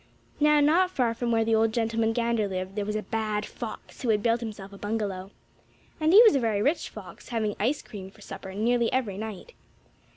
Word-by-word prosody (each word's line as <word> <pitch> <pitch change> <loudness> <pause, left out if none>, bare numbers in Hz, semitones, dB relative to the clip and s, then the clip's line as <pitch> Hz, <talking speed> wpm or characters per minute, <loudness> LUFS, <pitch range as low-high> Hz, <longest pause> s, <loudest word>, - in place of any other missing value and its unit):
Now, 300 0 +5
not 340 +6 +4
far 250 -10 0
from 235 +1 -2
where 225 -1 +2
the 225 - +1
old 220 0 +3
gentleman 225 0 0
gander 230 -2 0
lived 185 0 -4
there 205 -1 -2
was 210 - -2
a 215 - -2
bad 215 -2 -2
fox 230 -3 -8
who 250 - -1
had 210 -2 +2
built 230 0 +2
himself 205 -4 -7
a - - -10
bungalow. 205 -3 -3 0.7
And 310 0 +3
he 420 +6 +10
was 445 - +7
a - - +3
very 225 -4 0
rich 295 +7 0
fox, - - -11
having 220 -3 -1
ice 255 +8 0
cream 195 -4 -9
for 210 +2 -20
supper 190 -1 -8
nearly 235 +2 +1
every 230 -7 -1
night. 220 - -7
225 Hz, 215 wpm, -27 LUFS, 210-245 Hz, 0.7 s, he